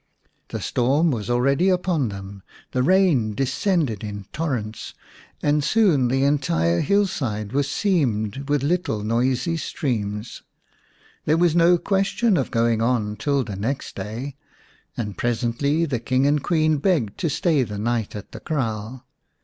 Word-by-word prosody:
The - - -5
storm 140 +7 +2
was 110 -3 -3
already 140 +9 +2
upon 180 - +1
them; 100 0 -8 0.3
the 125 - 0
rain 155 - +3
descended 135 - 0
in 105 -2 -6
torrents, 125 -9 -3 0.5
and 145 0 +2
soon 170 - +3
the 135 +2 +1
entire 85 - +2
hillside 130 - 0
was 140 +1 0
seamed 135 - 0
with 145 -2 +1
little 145 -9 0
noisy 125 +8 0
streams. 110 -8 -3 0.8
There 155 +2 +3
was 170 -1 +3
no 175 +1 +5
question 195 +4 +1
of 135 - 0
going 115 -1 +1
on 115 -3 0
till 140 +5 0
the 105 -5 -6
next 115 +8 -3
day, 115 +8 -6 0.6
and 105 -5 -4
presently 120 +7 0
the 135 -7 -2
King 130 +3 +1
and 145 0 +2
Queen 155 -3 +2
begged 140 - 0
to 165 - 0
stay 155 -1 +1
the 105 -4 -3
night 115 0 -1
at 105 - -8
the - - -8
kraal. 120 -4 -3
130 Hz, 145 wpm, -23 LUFS, 110-155 Hz, 0.8 s, no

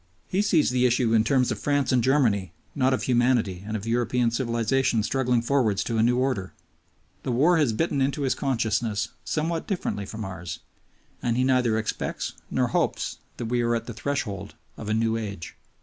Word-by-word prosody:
He 190 - +1
sees 170 -10 +3
the 125 0 +3
issue 120 -1 +2
in 110 -1 +5
terms, 125 0 +2
of 110 - -3
France 145 -1 +1
and 125 -2 +3
Germany 110 - +2 0.2
not 130 +1 +2
of 130 - 0
humanity 120 -7 +1
and 110 0 -2
of 105 - -8
European 120 +1 +1
civilization 120 0 +1
struggling 125 0 +1
forwards 120 -6 +1
to 115 -2 -1
a - - +5
new 120 +2 +3
order. 125 -8 -1 0.7
The 130 - -3
war 160 +8 +4
has 145 -7 +3
bitten 140 +4 0
into 140 +2 0
his 135 - +2
consciousness 115 -4 -1
somewhat 165 +1 -2
differently 105 - -2
from 110 -1 -6
ours, 90 -3 -6 0.6
and 120 -1 0
he 125 - +3
neither 125 -4 +2
expects 110 -1 -3 0.2
nor - - +1
hopes - - -1 0.2
that 120 - -4
we 120 +1 0
are 120 0 +1
at 115 - -3
the 120 - -6
threshold 105 -5 -3 0.2
of 110 - -7
a 110 - +2
new 115 0 +1
age. 100 -6 -6
120 Hz, 190 wpm, -26 LUFS, 110-130 Hz, 0.7 s, in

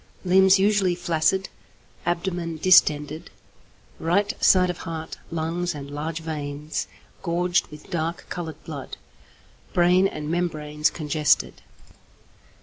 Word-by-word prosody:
limbs 190 +1 +6
usually 195 -2 +2
flaccid, 175 +2 +1 0.6
abdomen 175 -1 -2
distended; 155 -3 +3 0.7
right 190 +5 +1
side 180 -1 +5
of 175 - -10
heart, 160 -1 -6
lungs, 165 +1 -2
and 140 -1 -8
large 155 +3 -4
veins, 150 -1 -4 0.3
gorged 175 +1 +1
with 150 0 -13
dark 165 0 -2
coloured 160 -4 -5
blood. 145 -4 -7 0.8
Brain 180 +2 +4
and 150 -5 -6
membranes 155 -3 0
congested. 150 - 0
165 Hz, 105 wpm, -24 LUFS, 150-180 Hz, 0.8 s, limbs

